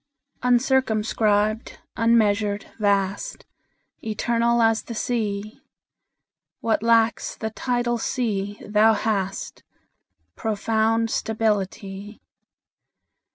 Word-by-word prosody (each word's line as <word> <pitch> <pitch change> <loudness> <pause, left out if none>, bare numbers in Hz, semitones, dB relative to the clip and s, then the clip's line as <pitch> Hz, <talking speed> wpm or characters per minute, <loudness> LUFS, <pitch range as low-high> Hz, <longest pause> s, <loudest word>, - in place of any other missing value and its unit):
UNCIRCUMSCRIBED, 220 -4 +1 0.2
unmeasured, 210 -3 +2
vast, 200 -2 0 0.6
Eternal 235 +2 +1
as 225 0 +3
the 235 - -8
Sea; 215 -3 -3 1.0
What 225 -2 0
lacks 230 0 +2
the 220 0 -4
tidal 240 0 -1
sea 205 -5 -2
thou 215 +1 +5
hast 200 -3 -2 0.7
Profound 225 +1 0
stability. 205 -2 -2
220 Hz, 70 wpm, -23 LUFS, 205-230 Hz, 1.0 s, thou